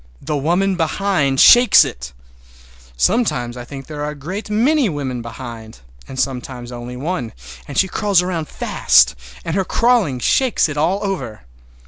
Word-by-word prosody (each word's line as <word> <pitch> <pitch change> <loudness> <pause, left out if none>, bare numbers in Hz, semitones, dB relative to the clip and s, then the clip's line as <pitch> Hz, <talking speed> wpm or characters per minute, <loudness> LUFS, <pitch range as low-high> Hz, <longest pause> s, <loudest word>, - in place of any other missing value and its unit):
The 150 +2 -2
woman 175 +7 +1
behind 165 -5 0
shakes 245 0 +7
it! - - -7 0.9
Sometimes 125 - 0
I 125 - -7
think 135 +1 -9
there 150 -1 -6
are 150 - -2
a 150 - -7
great 185 +10 -7
many 250 +4 +2
women 135 -6 -4
behind, 115 - -9 0.3
and 130 - -7
sometimes 125 -2 -4
only 120 +1 -8
one, 135 -4 -4 0.3
and 140 - -7
she 190 - +3
crawls 195 -1 +1
around 170 -4 -3
fast, 65 - +3 0.3
and 165 - -3
her 195 - +1
crawling 225 - +1
shakes 250 - +2
it 150 - -6
all 175 +7 0
over. 135 - -4
150 Hz, 155 wpm, -18 LUFS, 125-195 Hz, 0.9 s, shakes